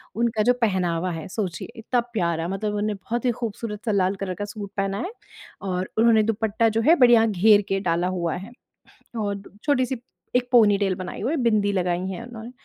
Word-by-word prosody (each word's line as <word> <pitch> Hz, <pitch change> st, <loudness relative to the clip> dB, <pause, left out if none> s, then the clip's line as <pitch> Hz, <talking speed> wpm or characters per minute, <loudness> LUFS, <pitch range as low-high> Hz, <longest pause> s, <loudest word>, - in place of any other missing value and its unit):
उनका 225 Hz, -1 st, +1 dB
जो 245 Hz, +3 st, +4 dB
पहनावा 185 Hz, -4 st, +1 dB
है 160 Hz, -2 st, -6 dB
सोचिए 185 Hz, -4 st, -4 dB
इतना 245 Hz, +2 st, 0 dB
प्यारा 170 Hz, -5 st, 0 dB
मतलब 195 Hz, +3 st, -2 dB
उन्होंने 210 Hz, +1 st, 0 dB
बहुत 235 Hz, +6 st, -4 dB
ही 245 Hz, -, +4 dB
खूबसूरत 225 Hz, -2 st, -5 dB
सा 220 Hz, -, +1 dB
लाल 195 Hz, -1 st, +2 dB
कलर 190 Hz, -1 st, -4 dB
का 205 Hz, -, -4 dB
सूट 205 Hz, -1 st, -7 dB
पहना 195 Hz, 0 st, -1 dB
है 365 Hz, -, -4 dB, 0.5 s
और 185 Hz, -1 st, -2 dB
उन्होंने 225 Hz, -1 st, +5 dB
दुपट्टा 220 Hz, +1 st, +1 dB
जो 225 Hz, +1 st, 0 dB
है 335 Hz, -, +8 dB
बढ़िया 240 Hz, -4 st, +6 dB
घेर 205 Hz, +1 st, +5 dB
के 195 Hz, -, +1 dB
डाला 175 Hz, -2 st, 0 dB
हुआ 175 Hz, -3 st, -1 dB
है। 195 Hz, +6 st, -8 dB, 0.7 s
और 200 Hz, -2 st, -2 dB, 0.2 s
छोटी-सी 260 Hz, -3 st, +1 dB, 0.4 s
एक 250 Hz, 0 st, +1 dB
पोनीटेल 205 Hz, -5 st, +4 dB
बनाई 185 Hz, 0 st, -6 dB
हुई 250 Hz, +8 st, -1 dB
है 330 Hz, -, 0 dB
बिंदी 215 Hz, -3 st, +2 dB
लगाई 180 Hz, -2 st, 0 dB
है 190 Hz, +5 st, -5 dB
उन्होंने। 235 Hz, -1 st, -9 dB
210 Hz, 195 wpm, -24 LUFS, 185-230 Hz, 0.7 s, है